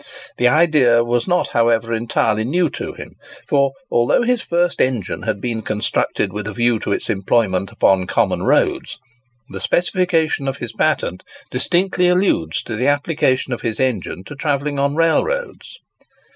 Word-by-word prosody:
The 125 - +3
idea 140 -6 +4
was 120 0 -1
not, 180 0 +1
however, 115 0 +1
entirely 110 -1 0
new 165 +5 0
to - - -6
him; - - -11 0.3
for, 140 -1 +2 0.2
although 120 - +2
his 245 -1 +1
first 175 0 0
engine 120 -7 -1
had 100 - -2
been 115 0 -3
constructed 105 -1 -1
with 105 0 -5
a 105 - -5
view 120 +1 +1
to - - -4
its - - -2
employment 100 -1 0
upon 95 -2 +2
common - - 0
roads, - - +1 0.5
the - - -7
specification 170 -5 0
of 135 -1 -2
his 120 -4 -6
patent 110 -8 -1 0.3
distinctly 180 +7 +1
alludes 180 - +1
to 115 - -5
the 125 +5 0
application 145 -3 +1
of 120 - -5
his 110 -2 -3
engine 110 -8 -2
to 145 - -10
travelling 145 0 -2
on 140 +1 0
railroads. 465 - -1
130 Hz, 160 wpm, -19 LUFS, 115-160 Hz, 0.5 s, idea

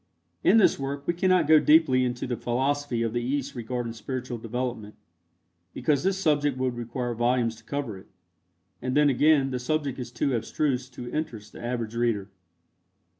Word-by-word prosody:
In 210 - +6
this 215 - +4
work 140 +1 -4
we 175 - +1
cannot 180 -1 +3
go 155 0 +7
deeply 150 -5 +5
into 125 -1 -2
the 125 - -2
philosophy 130 0 -1
of 115 -1 -2
the 120 - 0
East 140 +2 -2
regarding 120 0 -4
spiritual 125 +1 -5
development, 115 -2 -4 0.8
because 145 -3 +1
this 195 +3 +1
subject 145 -6 +1
would 130 -1 -1
require 120 +1 -3
volumes 120 0 +1
to 110 - -17
cover 120 -7 -4
it, - - -17 0.7
and 130 +2 -1
then 150 -1 +5
again 140 0 +3
the 125 - -2
subject 140 0 -2
is 120 -1 -6
too 130 +2 -1
abstruse 125 +2 -1
to 125 -1 -8
interest 125 -9 -4
the - - -10
average 120 -2 -3
reader. 115 -4 -1
125 Hz, 175 wpm, -26 LUFS, 120-145 Hz, 0.8 s, go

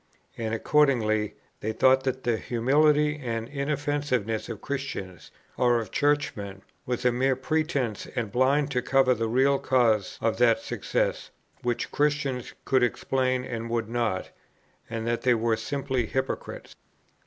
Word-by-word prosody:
And 110 -1 -3
accordingly 110 -6 +2 0.2
they 110 +1 -3
thought 130 +3 +4
that 130 0 -2
the 120 -2 +1
humility 150 +6 +2
and 115 -2 -3
inoffensiveness 140 -6 -1
of 115 -4 -5
Christians, 135 - -5 0.3
or 120 -1 +3
of 110 -4 -6
Churchmen, 105 -10 -1 0.2
was 125 0 -2
a 125 - +5
mere 130 +2 +1
pretence 135 - -1
and 115 -5 -2
blind 140 +5 +2
to 125 -2 +1
cover 130 0 +3
the 115 -1 -1
real 135 +3 +3
causes 115 -6 +2
of 115 -1 0
that 115 -2 +5
success, - - -2 0.3
which 120 -1 -2
Christians 145 -4 -1
could 130 -1 +3
explain 130 +1 0
and 115 -1 -5
would 115 -1 -1
not; 115 -5 -1 0.6
and 115 -1 -4
that 115 0 -1
they 125 -1 +3
were 115 0 +1
simply 130 +1 -2
hypocrites. 130 +3 -4
125 Hz, 140 wpm, -27 LUFS, 115-135 Hz, 0.6 s, a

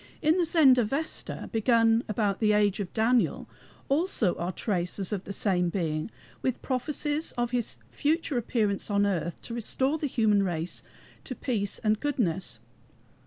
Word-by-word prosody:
In 310 +1 +3
the 350 -2 +2
Zendavesta 275 -2 +2
begun 225 0 +3
about 205 -2 0
the 215 -2 +3
age 205 -1 +2
of 195 -3 -4
Daniel 235 +2 +1 0.4
also 275 - +1
are 175 +2 -2
traces 185 +1 -2
of 195 -2 -4
the - - -6
same 180 -3 +1
Being, 160 -3 -2 0.3
with 255 -2 -1
prophecies 295 +4 -1
of 240 -1 -1
his 245 -2 -1
future 310 -1 0
appearance 220 -4 0
on 205 0 +2
earth 175 -4 -2
to 230 - -6
restore 265 +6 0
the 295 - -1
human 220 -5 +2
race 175 -2 -2 0.4
to 255 - -5
peace 210 -5 -2
and 215 -1 +2
goodness. 190 - -1
220 Hz, 150 wpm, -28 LUFS, 195-260 Hz, 0.4 s, In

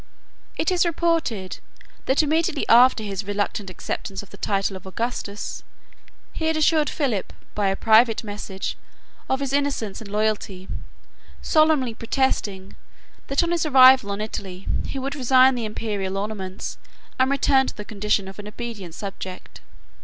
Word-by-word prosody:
It 325 - +1
is 360 -1 +3
reported, 330 - -1 0.5
that, 265 +4 +3
immediately 315 0 0
after 240 -1 +6
his 200 -2 -4
reluctant 205 0 -2
acceptance 190 +2 -5
of 205 - -17
the - - -10
title 195 -1 -1
of 190 0 -10
Augustus, 210 0 -4 0.7
he 320 - -3
had 320 0 +1
assured 310 -1 +3
Philip, 250 - -1 0.2
by 205 -2 0
a 195 - +1
private 225 +2 +4
message, 205 -2 -5 0.5
of 265 +1 0
his 275 -1 -2
innocence 280 -9 -1
and 215 - -9
loyalty, 205 -3 -1 0.8
solemnly 310 -6 +3
protesting, 220 -5 -1 0.5
that, 275 +4 +2
on 340 - -1
his 345 -1 +1
arrival 260 -6 +7
on 200 +1 -3
Italy, 195 -3 -6 0.2
he - - -5
would 270 +1 -3
resign 260 -1 +5
the 240 -3 -3
Imperial 205 -3 -3
ornaments, 195 -2 -5 0.4
and 260 +1 +4
return 275 -1 +3
to - - -6
the 210 - -6
condition 210 -2 0
of 190 +1 -10
an 205 - -7
obedient 210 -6 -7
subject. 190 -2 -8
220 Hz, 150 wpm, -23 LUFS, 200-270 Hz, 0.8 s, arrival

